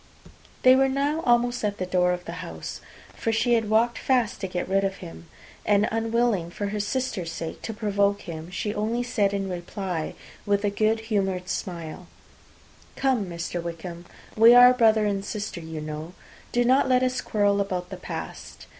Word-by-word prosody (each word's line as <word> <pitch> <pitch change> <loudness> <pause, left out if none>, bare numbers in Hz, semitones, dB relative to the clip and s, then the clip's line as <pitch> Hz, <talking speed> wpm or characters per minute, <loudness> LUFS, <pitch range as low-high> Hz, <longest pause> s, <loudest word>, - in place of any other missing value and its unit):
They 255 0 +8
were 270 0 +3
now 285 +4 0
almost 240 0 +2
at 205 -1 -1
the 185 - -2
door 180 0 +2
of 180 0 -3
the - - -6
house, 175 - -7 0.3
for 225 - -2
she 225 +2 +2
had 225 -2 +1
walked 230 +2 +2
fast 245 -5 +1
to 190 - -2
get 180 -1 -3
rid 195 +1 +2
of 195 0 -1
him; 80 - -11 0.4
and 205 0 +3
unwilling, 225 -5 +1
for 200 +3 -4
her 210 +1 -3
sister's 205 -5 -2
sake, 165 -1 -6
to - - -4
provoke 205 -2 0
him, 160 -1 -7
she 205 +3 -3
only 225 +4 -1
said 210 -5 +1
in 200 -1 -2
reply, 180 -2 -4 0.3
with 205 0 +1
a 205 - +1
good 220 +2 +1
humoured 195 -5 -1
smile, 170 -1 -5 0.9
"Come, 260 -7 +1
Mr. 170 0 -4
Wickham, 170 +1 -7 0.3
we 230 +2 +8
are 245 +1 +9
brother 220 -3 +4
and 200 -1 -1
sister, 205 -3 -5
you 160 -1 -6
know. 155 +2 -6 0.4
Do 245 0 +2
not 260 +2 +4
let 255 0 +4
us 255 0 0
quarrel 205 -1 +1
about 180 -2 -3
the - - -5
past. - - -7
205 Hz, 180 wpm, -25 LUFS, 180-230 Hz, 0.9 s, are